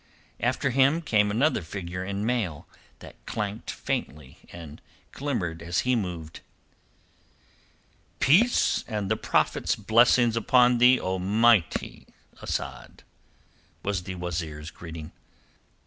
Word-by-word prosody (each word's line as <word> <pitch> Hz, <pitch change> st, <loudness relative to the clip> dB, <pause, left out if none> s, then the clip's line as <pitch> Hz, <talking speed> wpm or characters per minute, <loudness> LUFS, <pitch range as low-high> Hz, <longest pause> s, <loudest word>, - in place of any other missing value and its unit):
After 130 Hz, +3 st, 0 dB
him 135 Hz, +6 st, +3 dB
came 105 Hz, -7 st, +2 dB
another 130 Hz, +10 st, +1 dB
figure 90 Hz, +1 st, -6 dB
in 100 Hz, +2 st, -3 dB
mail 110 Hz, -11 st, -2 dB, 0.4 s
that -, -, -14 dB
clanked 105 Hz, +1 st, -4 dB
faintly 70 Hz, -2 st, -5 dB
and 80 Hz, -4 st, -10 dB, 0.3 s
glimmered 90 Hz, -, -3 dB
as 85 Hz, +1 st, -1 dB
he 125 Hz, 0 st, +1 dB
moved. 85 Hz, -7 st, -5 dB, 1.8 s
"Peace 215 Hz, -, +3 dB
and 105 Hz, -3 st, -3 dB
the -, -, +3 dB
Prophet's -, -, 0 dB
blessings 115 Hz, +2 st, +4 dB
upon 120 Hz, +1 st, +4 dB
thee, 125 Hz, +1 st, +6 dB
O 95 Hz, 0 st, -2 dB
mighty 105 Hz, 0 st, +2 dB, 0.3 s
Asad!" -, -, -5 dB, 0.8 s
was 100 Hz, -2 st, -1 dB
the 95 Hz, +1 st, -7 dB
wazeer's 80 Hz, -3 st, -5 dB
greeting. 80 Hz, -1 st, -9 dB
100 Hz, 110 wpm, -26 LUFS, 85-120 Hz, 1.8 s, thee